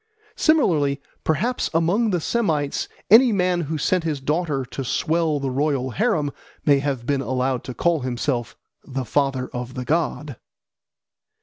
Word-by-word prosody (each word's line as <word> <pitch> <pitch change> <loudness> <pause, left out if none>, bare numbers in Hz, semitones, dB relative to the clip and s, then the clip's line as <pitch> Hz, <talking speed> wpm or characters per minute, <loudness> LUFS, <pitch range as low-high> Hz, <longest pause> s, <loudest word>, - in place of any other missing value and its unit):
Similarly, 160 - +2 0.2
perhaps, 215 - 0
among 185 +8 +2
the 180 -3 +1
Semites 155 -8 0 0.2
any 240 +3 +8
man 180 -3 +1
who 160 0 -3
sent 180 +4 +1
his 155 -3 -2
daughter 150 -1 -1
to 135 - -6
swell 155 +3 0
the 135 -1 -2
royal 135 -1 0
harem 170 - 0 0.3
may 145 -2 +5
have 135 -4 -2
been 140 0 0
allowed 130 -1 -1
to 125 - -6
call 170 -2 +2
himself 125 -1 -2 0.3
"the 135 -2 -4
father 135 +1 0
of 125 +1 -5
the 125 -1 -4
god." 150 -3 -1
145 Hz, 145 wpm, -23 LUFS, 135-170 Hz, 0.3 s, any